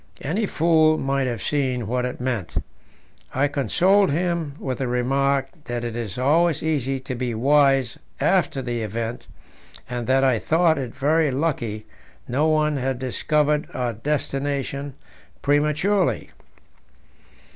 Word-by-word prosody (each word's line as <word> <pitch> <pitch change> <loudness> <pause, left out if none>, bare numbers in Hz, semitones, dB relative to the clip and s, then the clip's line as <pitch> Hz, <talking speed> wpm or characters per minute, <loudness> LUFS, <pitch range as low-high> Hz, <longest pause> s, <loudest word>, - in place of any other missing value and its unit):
Any 195 +9 -1
fool 160 -2 +3
might 135 -1 0
have 120 -5 -3
seen 130 -5 0
what 125 +3 -1
it 125 - -5
meant." 125 -7 -3 0.8
I 140 +2 +3
consoled 180 - +3
him 165 -1 -1
with 130 -5 -4
the 130 - -1
remark 135 +3 +1 0.2
that 120 0 -3
it 120 -1 -4
is 115 -4 -4
always 155 +5 +2
easy 135 -4 0
to 130 - -5
be 125 -2 -3
wise 135 0 +3 0.2
after 170 -8 +1
the 120 -1 -2
event, 115 +2 -4 0.6
and 120 -1 -4
that 135 +1 +3
I 130 -4 +3
thought 160 +1 +2
it 125 -4 -5
very 155 +2 +2
lucky 130 -7 -2 0.4
no 140 +6 +1
one 155 -1 +2
had 130 -1 -1
discovered 150 +3 0
our 125 -2 -1
destination 140 +2 -2 0.5
prematurely. 150 +7 +1
135 Hz, 135 wpm, -23 LUFS, 125-150 Hz, 0.8 s, fool